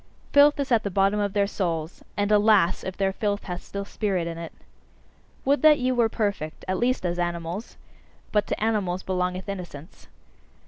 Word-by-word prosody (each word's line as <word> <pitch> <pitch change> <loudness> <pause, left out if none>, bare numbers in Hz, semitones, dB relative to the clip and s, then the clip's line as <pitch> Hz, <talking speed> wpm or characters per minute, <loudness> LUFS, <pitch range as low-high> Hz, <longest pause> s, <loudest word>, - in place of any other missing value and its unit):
Filth 290 +1 +6
is 275 -1 -2
at 230 -2 +4
the 200 - -3
bottom 195 +2 +2
of 200 -1 -1
their 200 -1 +2
souls; 170 -5 -3
and 205 +1 +1
alas! 210 -4 +4
if 190 - -5
their 195 -1 +1
filth 205 0 -1
hath 180 -1 -5
still 200 0 -6
spirit 195 -4 -1
in 170 0 -4
it! 165 -1 -7 0.9
Would 280 +2 +3
that 310 -1 +7
ye 255 -1 0
were 240 -3 +2
perfect 200 -9 -3
at 185 0 -1
least 250 -4 0
as 175 0 -1
animals! 175 +4 -4 0.5
But 210 -1 +1
to - - -2
animals 195 -5 0
belongeth 180 0 -2
innocence. 180 -4 -8
200 Hz, 180 wpm, -25 LUFS, 180-215 Hz, 0.9 s, that